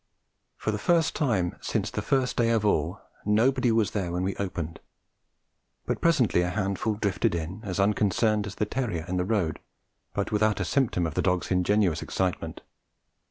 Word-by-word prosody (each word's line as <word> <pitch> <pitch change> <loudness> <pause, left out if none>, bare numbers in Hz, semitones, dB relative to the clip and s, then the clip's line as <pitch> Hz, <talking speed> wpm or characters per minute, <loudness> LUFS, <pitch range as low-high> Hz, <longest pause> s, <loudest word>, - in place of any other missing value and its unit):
For 110 - -1
the 105 - -3
first 165 +6 +2
time 105 - 0
since - - -1
the - - -2
first 130 -2 +1
day 115 -1 +2
of 115 -2 +2
all, 85 -1 +1 0.2
nobody 120 +4 +3
was 110 -2 +2
there 95 -5 -2
when 90 +1 -1
we 95 +1 -1
opened; 85 -4 -4 1.1
but - - -2
presently 135 - +3
a 90 - 0
handful 100 +2 -1
drifted 100 -4 0
in, 85 +6 -4
as 100 -2 -3
unconcerned 105 +1 +2
as 100 - -7
the 105 - 0
terrier 105 -9 -2
in 90 0 -2
the 90 - 0
road, 95 -7 0 0.6
but - - -1
without 105 0 +2
a 95 - 0
symptom 90 -2 +1
of 80 - -3
the - - 0
dog's 90 0 0
ingenuous 90 -2 +2
excitement. 95 -2 -2
100 Hz, 175 wpm, -27 LUFS, 90-110 Hz, 1.1 s, nobody